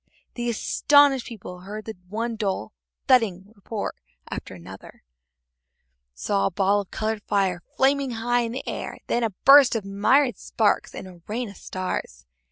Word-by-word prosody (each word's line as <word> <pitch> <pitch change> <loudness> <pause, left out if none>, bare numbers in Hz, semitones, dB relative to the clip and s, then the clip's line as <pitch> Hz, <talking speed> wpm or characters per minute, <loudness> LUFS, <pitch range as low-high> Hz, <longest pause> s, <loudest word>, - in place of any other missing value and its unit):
The 240 -1 -3
astonished 280 +3 +3
people 185 -5 -9
heard 210 +4 -8 0.2
one 230 +3 -3
dull 195 - -3 0.3
thudding 205 -6 +2
report 205 +1 -5 0.4
after - - -6
another, 95 +2 -12 1.1
saw 100 +11 0
a - - -3
ball 200 +2 +2
of 195 - -12
colored 215 -1 -2
fire 190 -4 +1 0.2
flaming 275 0 +2
high 240 +2 +1
in 230 -1 -3
the 260 - -6
air, - - -5
then 240 - 0
a 225 - +1
burst 275 +6 +6
of 215 -3 -2
myriad 245 +7 +2
sparks - - 0
and - - -7
a 180 -2 -14
rain 230 +2 -3
of 200 - -12
stars. - - -5
215 Hz, 155 wpm, -24 LUFS, 185-240 Hz, 1.1 s, burst